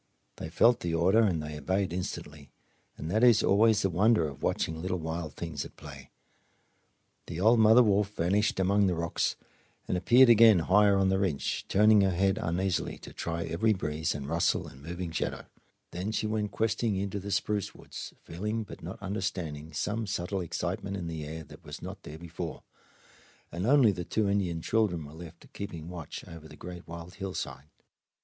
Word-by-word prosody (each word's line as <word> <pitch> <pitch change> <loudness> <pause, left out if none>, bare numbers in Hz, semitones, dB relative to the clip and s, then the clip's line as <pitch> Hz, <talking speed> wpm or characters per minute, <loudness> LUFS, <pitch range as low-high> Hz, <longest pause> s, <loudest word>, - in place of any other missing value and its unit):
They 80 - -6
felt 115 +8 +4
the 85 -1 -2
order 95 +6 +4
and 90 -8 +1
they 75 0 -6
obeyed 95 +2 -1
instantly 75 -5 -6 0.5
and 80 +2 -5
that 110 +4 +2
is 120 -3 +6
always 105 +1 +4
the 95 - +2
wonder 100 -1 +3
of 70 - -9
watching 80 0 -1
little 95 +1 -2
wild 80 -1 -5
things 80 -5 -4
at - - -12
play. - - -11 1.2
The 85 - -5
old 110 +5 +5
mother 110 +3 +7
wolf 100 -2 +2
vanished 95 +5 +1
among 100 +2 +3
the 90 - +1
rocks 85 0 -1 0.5
and - - 0
appeared 120 +9 +6
again 115 -3 +7
higher 100 +4 +4
on 95 -1 +3
the 95 0 +2
ridge, 90 -8 -1
turning 105 +1 +5
her 95 - +3
head 95 +2 +1
uneasily 90 +2 -1
to - - -12
try 85 0 -3
every 110 +7 +1
breeze 80 -4 -2
and 70 -2 -5
rustle 85 +3 +1
and 65 - -13
moving 85 +2 -5
shadow. 80 - -3 0.5
Then 95 +5 -3
she 110 - -1
went 105 -1 -1
questing 110 0 0
into 100 +1 -2
the 100 +1 -7
spruce 105 0 -1
woods, - - -9
feeling 105 +6 -3
but 105 - -11
not 115 - -7
understanding 90 -6 -4
some 105 +8 -2
subtle 95 -1 -2
excitement 95 +3 -3
in 90 - -5
the 80 -2 -5
air 80 +2 -6
that - - -15
was - - -8
not - - -8
there 75 - -9
before, 85 0 -7 0.9
and 90 +5 -3
only 135 -5 +6
the 90 -2 -4
two 110 +3 0
Indian 90 -5 0
children 100 -8 +1
were 75 - -11
left 80 0 -12
keeping 85 -5 -6
watch 85 -4 -8
over 80 -2 -10
the - - -13
great 90 -1 -9
wild 85 +1 -8
hillside. 95 -6 -6
90 Hz, 185 wpm, -29 LUFS, 85-105 Hz, 1.2 s, mother